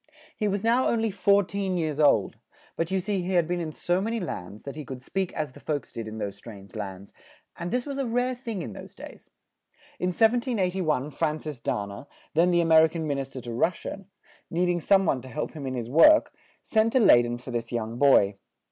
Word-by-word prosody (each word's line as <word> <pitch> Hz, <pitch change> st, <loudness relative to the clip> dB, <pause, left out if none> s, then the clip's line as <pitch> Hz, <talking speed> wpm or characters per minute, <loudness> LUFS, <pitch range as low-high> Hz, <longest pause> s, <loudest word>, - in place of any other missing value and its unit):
He 210 Hz, -, -1 dB
was 200 Hz, 0 st, -1 dB
now 240 Hz, +3 st, +3 dB
on 235 Hz, -, +1 dB
ly 225 Hz, -1 st, 0 dB
four 200 Hz, +1 st, +3 dB
teen 195 Hz, -1 st, -2 dB
years 155 Hz, -3 st, -2 dB
old; 140 Hz, -10 st, +3 dB, 0.4 s
but 165 Hz, 0 st, -1 dB
you 190 Hz, 0 st, +1 dB
see 195 Hz, 0 st, -1 dB
he 185 Hz, +2 st, -3 dB
had 175 Hz, -3 st, +3 dB
been 175 Hz, 0 st, -1 dB
in 160 Hz, -2 st, -3 dB
so 175 Hz, +4 st, -1 dB
ma 215 Hz, -, -2 dB
ny 230 Hz, -, -1 dB
lands, 105 Hz, -, -6 dB
that 140 Hz, -, -7 dB
he 155 Hz, -, -6 dB
could 130 Hz, -1 st, -7 dB
speak 190 Hz, +8 st, -3 dB
as 150 Hz, -4 st, -3 dB
the -, -, -14 dB
folks 145 Hz, -5 st, -4 dB
did 115 Hz, -1 st, -5 dB
in 110 Hz, 0 st, -7 dB
those 100 Hz, -2 st, -4 dB
strange 100 Hz, -2 st, -12 dB
lands, 100 Hz, -3 st, -7 dB, 0.4 s
and 170 Hz, +1 st, -5 dB
this 245 Hz, +3 st, -1 dB
was 280 Hz, -1 st, -4 dB
a 270 Hz, -, -1 dB
rare 245 Hz, +2 st, 0 dB
thing 230 Hz, -7 st, -5 dB
in 115 Hz, -, -7 dB
those -, -, -11 dB
days. -, -, -12 dB, 0.7 s
In 180 Hz, -, 0 dB
1781 185 Hz, -, +1 dB
Fran 150 Hz, +2 st, -1 dB
cis 150 Hz, -5 st, -7 dB
Da 105 Hz, -, -1 dB
na, 100 Hz, +6 st, -9 dB, 0.3 s
then 170 Hz, +3 st, +4 dB
the 175 Hz, -1 st, +3 dB
A -, -, +1 dB
mer 160 Hz, -1 st, +7 dB
i -, -, +2 dB
can 160 Hz, 0 st, -4 dB
Min 140 Hz, -2 st, -1 dB
is 135 Hz, 0 st, -4 dB
ter 130 Hz, -, -8 dB
to 120 Hz, 0 st, -6 dB
Rus 170 Hz, +9 st, +1 dB
sia, 195 Hz, 0 st, -7 dB, 0.4 s
need 175 Hz, +2 st, +1 dB
ing 175 Hz, -1 st, 0 dB
some 195 Hz, +3 st, +4 dB
one 135 Hz, -6 st, +1 dB
to 130 Hz, -, -11 dB
help 150 Hz, +4 st, -4 dB
him 145 Hz, -4 st, -7 dB
in 130 Hz, -, -3 dB
his 120 Hz, -2 st, -4 dB
work, 165 Hz, -, +6 dB, 0.3 s
sent 220 Hz, 0 st, +2 dB
to 260 Hz, -, +5 dB
Ley 125 Hz, -, +7 dB
den 120 Hz, 0 st, -3 dB
for 125 Hz, +1 st, -9 dB
this 115 Hz, -1 st, -3 dB
young 115 Hz, 0 st, -3 dB
boy. 105 Hz, -8 st, +5 dB
160 Hz, 245 wpm, -26 LUFS, 125-195 Hz, 0.7 s, mer